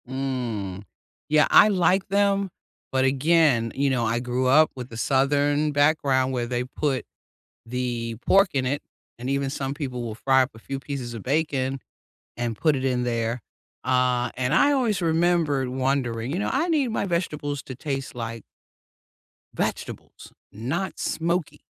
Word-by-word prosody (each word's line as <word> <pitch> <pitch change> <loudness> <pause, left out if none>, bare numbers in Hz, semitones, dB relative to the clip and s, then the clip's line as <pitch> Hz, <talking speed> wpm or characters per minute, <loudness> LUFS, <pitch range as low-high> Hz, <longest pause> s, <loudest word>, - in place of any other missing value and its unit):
Mm. 120 -8 -3 0.5
Yeah, 150 0 +5
I 215 - +7
like 190 0 +2
them, 200 0 +2 0.4
but 130 0 +2
again, 135 -4 +3
you 140 0 +1
know, 125 -3 +1
I 115 +1 0
grew 125 +1 -1
up 155 +4 +5
with 125 -1 -7
the 115 - -9
southern 145 +3 +2
background 140 -3 +2
where 120 -2 -1
they 120 0 -1
put 135 +1 -2 0.6
the 120 -1 -3
pork 195 0 +5
in 130 -2 +1
it, 140 +3 -1 0.4
and 125 +2 -5
even 140 0 0
some 135 0 -3
people 130 -4 -4
will 115 -2 -5
fry 130 +3 +3
up 130 - -2
a - - -12
few 135 +4 -5
pieces 135 -4 -5
of 115 - -7
bacon, 135 -2 0 0.6
and 120 -1 -2
put 155 -3 +2
it 130 - -3
in 125 -2 +1
there. 115 0 -1 0.5
Uh, 125 -1 +2
and 130 +2 -1
I 285 - +5
always 230 -8 +1
remembered 165 -5 +2
wondering, 130 -2 -1
you 175 - -1
know, 210 - -1
I 290 +6 +1
need 295 -6 +2
my 220 - -1
vegetables 150 -6 -2
to 130 - -8
taste 135 -1 -4
like 115 -1 -5 1.1
vegetables, - - -5 0.2
not 155 - -3
smoky. 170 0 -1
135 Hz, 160 wpm, -25 LUFS, 125-155 Hz, 1.1 s, I